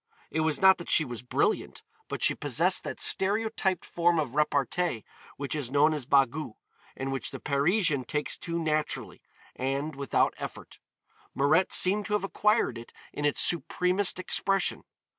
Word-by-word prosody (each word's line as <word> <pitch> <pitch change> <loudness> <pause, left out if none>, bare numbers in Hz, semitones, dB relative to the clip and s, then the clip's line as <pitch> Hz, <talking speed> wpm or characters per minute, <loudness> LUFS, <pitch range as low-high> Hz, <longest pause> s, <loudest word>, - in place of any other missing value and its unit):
It 160 - -2
was 155 -2 +1
not 190 -1 +6
that 175 - -8
she 155 - +4
was 120 -3 -7
brilliant, 415 - -1 0.2
but - - -4
she - - +4
possessed - - 0
that - - -6
stereotyped 195 -2 +1
form 170 0 +1
of 145 -6 -2
repartee 150 -2 0 0.3
which 140 -2 -4
is 145 -6 -2
known 145 +3 +3
as 145 -5 -5
bagou, 140 -2 +1 0.4
and 135 0 -4
which 135 - -3
the - - -8
Parisian 145 - +1
takes 150 -1 -1
to 170 -1 -4
naturally 155 -2 -2 0.3
and 135 +4 -3
without 140 0 0
effort. - - -9 0.6
Mirette 155 +7 +2
seemed 200 +3 +4
to 210 - -3
have 210 - 0
acquired 210 - +1
it 120 - -12 0.2
in 145 - -3
its 145 - +1
supremest 180 +3 +1
expression. 195 +1 -1
155 Hz, 160 wpm, -28 LUFS, 140-185 Hz, 0.6 s, not